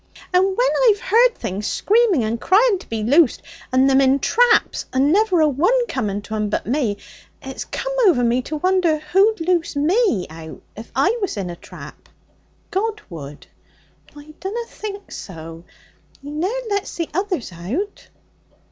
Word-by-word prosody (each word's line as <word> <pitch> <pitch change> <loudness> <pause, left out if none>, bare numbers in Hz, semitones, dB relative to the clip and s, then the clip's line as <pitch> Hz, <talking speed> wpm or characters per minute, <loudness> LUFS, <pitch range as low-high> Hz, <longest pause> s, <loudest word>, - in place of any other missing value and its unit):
'And 365 +1 +5
when 390 +6 +1 0.2
I've 410 -1 +2
heard 485 0 +3
things 200 +3 -4
screaming 420 - +2
and 225 +2 -2
crying 405 +1 +3
to - - -15
be 225 -1 -3
loosed, 285 +4 +3 0.3
and 260 +1 +4
them 270 0 +4
in 270 0 +4
traps, 465 - +2
and 270 +4 +2
never 395 -4 +3
a 310 - +5
one 365 - +2
coming 205 - -3
to 215 - -8
'em 210 -1 -1
but - - -2
me, 240 -5 -1 0.4
it's 265 0 -7
come - - -4
o'er 285 -10 +4
me 240 +2 +2
to 300 +4 -6
won'er 365 -1 +2
who'd 385 +8 +2
loose 340 -2 0
me 310 - +2
out 160 0 -10 0.2
if 220 +2 -10
I 390 - +2
was 390 - -2
in 185 -3 -3
a - - -7
trap.' - - -13 0.6
'God 430 +2 -1
would.' 145 -3 -9 0.7
'I 295 +1 -13
dunna 450 +5 -4
think 405 -3 -8
so. 165 -2 -9 0.5
He 285 +1 -9
ne'er 315 +5 -1 0.2
lets 405 -1 -2
the 335 -2 -2
others 365 - -2
out.' 235 - -5
310 Hz, 165 wpm, -20 LUFS, -, 0.7 s, And